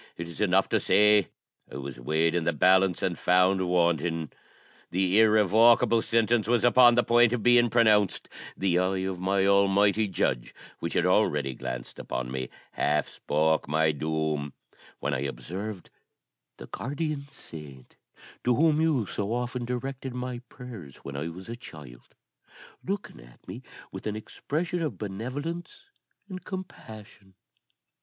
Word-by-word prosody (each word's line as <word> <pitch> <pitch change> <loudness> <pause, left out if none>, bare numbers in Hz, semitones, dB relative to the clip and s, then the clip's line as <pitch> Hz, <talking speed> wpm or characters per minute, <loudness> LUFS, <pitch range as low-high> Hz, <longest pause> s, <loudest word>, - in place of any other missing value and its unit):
It 85 - -5
is 85 - -8
enough 95 -1 +3
to - - +2
say, 105 -2 +4 0.4
I - - -9
was 70 -2 -7
weighed 80 +6 +1
in 85 -1 0
the 85 - 0
balance, 95 +3 +3
and - - 0
found 90 +1 +2
wanting. 85 -2 0 0.6
The 95 +3 +2
irrevocable 110 +2 +5
sentence 115 -1 +1
was 120 -2 +2
upon 120 0 +6
the 120 - +3
point 120 0 +4
of 120 -4 -2
being 120 -1 +5
pronounced; 110 -4 +3 0.3
the 90 -2 +1
eye 95 +1 0
of 95 -2 -4
my 95 +1 +1
Almighty 100 +2 +3
Judge, 65 -9 -2 0.2
which 85 - -4
had 85 - +1
already 75 -8 +2
glanced 60 -1 -7
upon 60 0 -4
me, 65 0 -4 0.2
half 75 +1 0
spoke 80 +1 0
my 80 +1 +2
doom; 75 -1 -2 0.5
when 70 - -2
I 70 - -1
observed 95 +8 -6 0.7
the - - -9
guardian 145 +1 -4
saint, 75 - -11 0.5
to 125 0 +2
whom 155 +3 +3
you 150 -9 +1
so 100 +2 -4
often 120 +1 -3
directed 125 +1 -5
my 125 -1 -4
prayers 110 - -10
when 70 - -7
I 75 +4 -3
was 90 +3 -9
a 115 - -5
child, 75 - -13 0.7
looking 200 +1 -5
at - - -18
me - - -8 0.3
with - - -7
an 105 - -2
expression 165 +10 -4
of 145 - -3
benevolence 145 - -6 0.4
and 185 -2 -8
compassion. 110 - -10
100 Hz, 150 wpm, -27 LUFS, 80-120 Hz, 0.7 s, upon